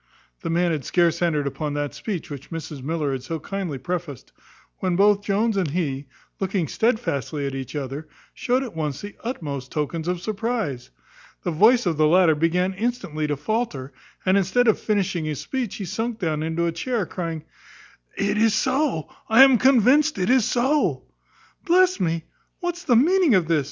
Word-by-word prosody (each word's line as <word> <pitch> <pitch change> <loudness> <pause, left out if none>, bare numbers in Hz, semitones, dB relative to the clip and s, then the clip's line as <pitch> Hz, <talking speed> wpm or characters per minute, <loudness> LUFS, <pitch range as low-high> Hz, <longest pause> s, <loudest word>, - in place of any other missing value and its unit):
The - - -4
man 170 +1 +2
had 150 -4 -2
scarce 170 +1 +1
entered 155 -4 +1
upon 145 +1 -3
that 145 -1 -2
speech 190 -8 -5
which 140 -1 -8
Mrs 160 -4 -6
Miller 150 0 -1
had 135 -1 -3
so 160 +5 -5
kindly 180 -3 -4
prefaced, 170 -3 -5 0.5
when 185 -2 0
both 200 +2 +4
Jones 210 +2 +1
and 180 -6 0
he, 140 -4 -2 0.3
looking 190 -4 -1
stedfastly 155 - -1
at 135 - -3
each 135 +1 -6
other, 145 +2 -5 0.3
showed 255 +2 0
at 240 -9 -8
once 150 -4 -3
the 205 0 -8
utmost 145 - -5
tokens 160 +2 -3
of 180 0 -1
surprize. 215 - -3 0.5
The 175 - -1
voice 225 +9 +5
of 165 -4 0
the 155 0 +4
latter 175 0 +5
began 175 +5 +1
instantly 190 -8 -2
to 145 -1 -1
faulter; 150 - -3 0.3
and, 190 +1 +4
instead 215 +6 +2
of 220 - +4
finishing 195 -6 -1
his 150 -3 -3
speech, 255 -6 -3
he 200 - -5
sunk 225 +5 -3
down 160 -6 -1
into 160 +2 -1
a 170 - +1
chair, 215 +5 -2
crying, 165 -4 -5 0.7
"It 200 +1 0
is 220 -1 +4
so, 260 - 0 0.2
I 225 +4 +8
am 265 -3 +6
convinced 270 +3 +4
it 185 +5 +1
is 255 -4 +4
so!" 270 +5 +1 0.6
"Bless 365 +1 +3
me! 165 -3 0 0.4
what's 350 0 -4
the 245 - +4
meaning 330 - +4
of 180 -4 +2
this?" 165 -2 +3
180 Hz, 180 wpm, -23 LUFS, 155-225 Hz, 0.7 s, I